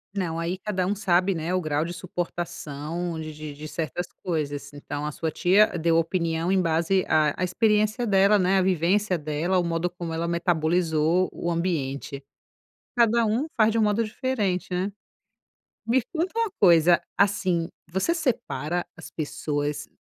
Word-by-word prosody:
Não, 165 -4 -2
aí 170 +3 -2
cada 185 -2 -2
um 205 - 0
sabe, 185 -1 +2
né, 165 +3 -2
o 185 - +1
grau 155 0 0
de 175 - -5
suportação 170 -1 -4
de 155 0 -6
de 150 -1 -7
de 155 +2 -8
certas 165 +2 -3 0.2
coisas. 145 -4 -3
Então, 145 +1 -5
a 150 - -2
sua 160 +3 -3
tia 190 +7 +4
deu 165 0 +2
opinião 165 0 0
em 190 - +3
base 170 +2 +1
à 155 +2 +2
experiência 215 +4 +1
dela, 200 +1 +5
né, 185 +1 +3
a - - +4
vivência 185 +2 +2
dela, 155 +5 0
o - - +1
modo 170 +1 0
como 175 -2 -6
ela 165 +1 -2
metabolizou 170 0 +1
o 170 - -3
ambiente. 140 -5 -2 0.7
Cada 235 -1 +4
um 230 +8 0
faz 220 -1 +4
de 230 - 0
um - - +3
modo 215 +2 +2
diferente, 215 -5 -1
né. 185 +3 -1 1.0
Me 255 +2 +3
conta 340 +3 -1
uma 455 -3 +1
coisa, 170 -2 +6 0.2
assim, 185 -4 +2 0.2
você 190 - +1
separa 175 - -2
as - - -10
pessoas, 145 -1 -3
175 Hz, 160 wpm, -25 LUFS, 160-195 Hz, 1.0 s, coisa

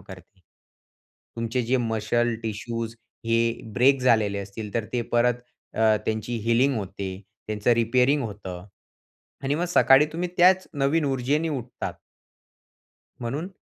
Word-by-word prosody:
करते. 95 0 -14 1.0
तुमचे 115 +2 -1
जे 125 +3 +1
मसल, 115 0 0
टिश्यूज 115 +1 -4 0.3
हे 115 0 +3 0.4
ब्रेक 135 +2 +4
झालेले 110 -5 +2
असतील, 100 +1 -7
तर 115 -2 0
ते 120 -1 0
परत 120 0 +4 0.4
अ, 110 -1 +4
त्यांची 110 +2 -2
हीलिंग 125 +4 +3
होते, 95 -1 -4 0.4
त्यांचं 105 +2 0
रिपेअरिंग 125 +5 +2
होतं 95 -4 -7 0.8
आणि 140 - +1
मग 170 +4 0
सकाळी 145 -3 +6
तुम्ही 175 +2 -2
त्याच 185 +1 +5
नवीन 145 +3 +1
ऊर्जेने 140 +5 0
उठतात." 125 -5 -5 1.3
म्हणून 140 +10 -3
120 Hz, 125 wpm, -25 LUFS, 110-135 Hz, 1.3 s, सकाळी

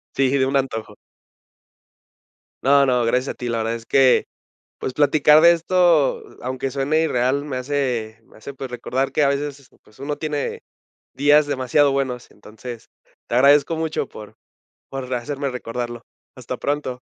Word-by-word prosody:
Sí, 135 -1 +2
de 130 - +3
un 135 +1 0
antojo. 130 -5 -2 1.7
No, 140 +1 +5
no, 125 -2 +2
gracias 125 +3 0
a - - -20
ti, 125 - -5
la 115 - -1
verdad 115 +1 -1
es 115 0 -8
que, 135 -2 +4 0.5
pues - - -3
platicar 150 +1 +5
de 170 +2 +7
esto, 170 -3 +2 0.2
a - - -6
aunque 130 +1 -3
suene 140 +4 0
irreal, 135 -1 0
me 145 -3 -5
hace 125 -4 -2
me - - -22
hace, 125 +6 -9
pues 135 -1 -7
recordar 125 +2 -2
que 150 - +2
a 140 - +4
veces, 140 -1 -4
pues 105 - -23
uno 145 +1 -4
tiene 150 -2 -3 0.5
días 145 +2 +4
demasiado 140 +1 +2
buenos, 130 -3 -3
entonces, 110 +3 -11 0.4
te 120 - -2
agradezco 145 +5 +4
mucho 160 -3 -2
por 105 -1 -12 0.5
por 130 -1 -6
hacerme 140 +3 -3
recordarlo. 120 -1 -5 0.3
Hasta - - -6
pronto. 140 -3 -3
135 Hz, 160 wpm, -21 LUFS, 125-145 Hz, 1.7 s, de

